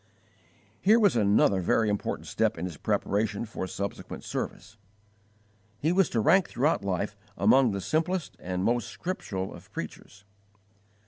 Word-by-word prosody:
Here 215 +4 +5
was 205 - +4
another 100 -3 +3
very 110 +5 +2
important 105 -1 -2
step - - 0
in 85 - -3
his 90 -4 -5
preparation 105 +7 -1
for 105 -4 -5
subsequent 100 +1 -5
service. 110 - -5 1.0
He 155 +8 +1
was 190 -1 +3
to 115 - 0
rank 185 - +4
throughout 140 -1 +1
life 95 -2 -2 0.2
among 135 -2 +5
the 100 -2 -2
simplest 165 - -1
and 90 0 -3
most 120 +3 +1
scriptural 100 - -4
of - - -14
preachers. 100 - -8
110 Hz, 140 wpm, -28 LUFS, 100-155 Hz, 1.0 s, Here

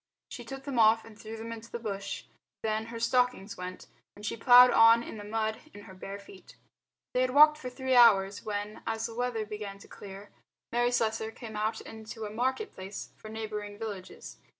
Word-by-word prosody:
She - - -8
took 270 0 -8
them 270 -3 -2
off 225 0 +5
and 225 -1 -13
threw 220 +1 -8
them 225 +1 -7
into 230 0 -8
the - - -3
bush; 200 -4 -5 0.4
then 220 0 -1
her 230 0 -7
stockings 245 -4 +1
went, 180 0 -7 0.3
and 205 - -10
she - - -2
ploughed 245 +2 +8
on 230 +1 +7
in 225 - -8
the 205 - -7
mud 220 +1 -2 0.2
in 205 - -9
her 190 - -12
bare 195 +1 -7
feet. 200 -1 -15 0.6
They 250 - +2
had 255 +1 0
walked 305 +1 +8
for 255 - -5
three 260 +1 -1
hours 205 -5 +6
when, 210 0 -4
as 225 -1 -1
the 230 - -5
weather 240 -2 -2
began 210 -2 -6
to 200 - -15
clear, 200 0 -11 0.4
Mary 240 +1 +2
Slessor 220 -2 0
came 225 -1 -9
out 215 +1 -1
into 220 0 -8
a 205 - -6
market 260 - -1
place 190 +2 -7
for 215 - -11
neighbouring 210 -2 -5
villages. 205 -4 -7
220 Hz, 200 wpm, -30 LUFS, 205-235 Hz, 0.6 s, ploughed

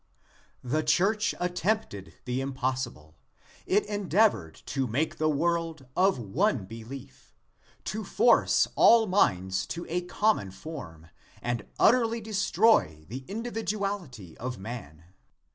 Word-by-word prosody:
The 130 +5 0
church 190 +8 +2
attempted 180 - -2
the 125 +1 -1
impossible. 130 - -3 0.5
It 205 +2 +2
endeavored 200 - +1
to 135 -2 -1
make 140 +8 -1
the 155 0 +2
world 165 -1 -1
of 190 -2 +3
one 125 - 0
belief; 125 +5 -11 0.5
to 215 +1 -4
force 235 +4 +4
all 230 -1 +6
minds 95 - +1
to 170 - -5
a 175 +2 0
common 180 - +1
form, 95 - -9 0.3
and 120 -1 -3
utterly 230 -1 +4
destroy 200 - +2
the 130 +4 -6
individuality 200 - -4
of 125 -1 -4
man. 95 -7 -8
155 Hz, 110 wpm, -28 LUFS, -, 0.5 s, all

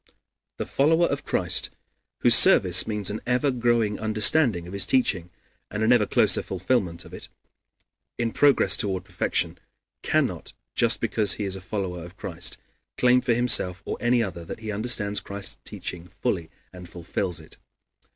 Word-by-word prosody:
The - - -4
follower 160 +5 +2
of 140 -3 -3
Christ, 90 -1 -1 0.5
whose - - +5
service 90 -1 +6
means 105 -3 -1
an 110 - -6
ever 125 +3 +1
growing 120 -4 0
understanding 110 - +2
of 90 - -10
his 100 - +1
teaching, 95 -9 0 0.4
and 105 +2 -4
an 110 - +3
ever 115 -4 +3
closer - - +4
fulfillment 90 -3 -2
of - - -15
it, - - -10 0.9
in 115 -1 -2
progress 135 -9 +4
toward 95 -3 -3
perfection, 90 -2 -2 0.4
cannot, - - -2 0.2
just - - +3
because 105 -3 +2
he 105 - -4
is 95 -1 -2
a 95 - -9
follower, 90 -3 -5
of 90 +2 -13
Christ, 85 -1 -2 0.4
claim 125 0 +3
for 120 - 0
himself 110 -7 +2
or - - -4
any 120 0 +1
other 90 -5 -6
that 85 - -9
he 110 -1 -5
understands 105 -1 0
Christ's 100 0 -2
teaching 90 -1 -7
fully 85 -1 -4 0.2
and 90 -1 -11
fulfills 90 0 -4
it. 80 - -16
105 Hz, 160 wpm, -24 LUFS, 90-120 Hz, 0.9 s, service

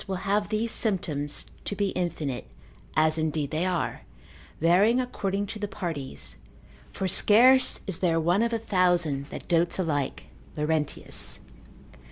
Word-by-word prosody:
will 190 - -2
have 205 +1 +1
these 220 +1 -1
symptoms 155 -9 -1 0.2
to 205 - -3
be 200 0 0
infinite, 155 -9 -3 0.5
as 155 +1 +3
indeed 155 -2 -1
they 165 +4 0
are, 180 -3 -1 0.6
varying 195 +9 +4
according 205 -5 -2
to 210 +2 -7
the 205 - -2
parties, 140 - -5 0.5
for 190 - -2
scarce 245 +7 +5
is 190 -4 -4
there 165 -3 +2
one 175 +5 +2
of 235 0 +1
a 230 - +1
thousand 175 -9 +1
that - - -8
dotes 170 0 +2
alike, 150 -7 -1 0.3
Laurentius 150 0 -1 0.2
c. - - -22
16. - - -22
175 Hz, 150 wpm, -27 LUFS, 155-205 Hz, 0.6 s, scarce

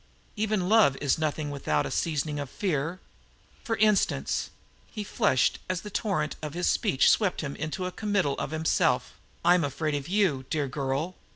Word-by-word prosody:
Even 210 -4 0
love 205 -10 +5
is 145 +1 +1
nothing 155 -1 -1
without 75 - 0
a - - -4
seasoning 150 -2 -1
of 140 -2 -4
fear. 170 -1 -2 0.6
For 230 -4 -1
instance" 210 -1 +2 0.4
he 215 - -5
flushed 130 -9 +1
as 185 -1 -1
the 210 - -8
torrent 180 -8 -1
of 150 0 -5
his 175 - -1
speech 130 - +3
swept 200 -5 +3
him 140 -3 -4
into 155 +5 -4
a 180 - -3
committal 200 -8 0
of - - -2
himself 160 +1 +1 0.3
"I 175 - +7
am 180 -2 +3
afraid 150 +2 -2
of 145 -1 -3
you, 180 -9 +1
dear 150 -3 0
girl. 140 +6 -2
160 Hz, 175 wpm, -27 LUFS, 145-190 Hz, 0.6 s, I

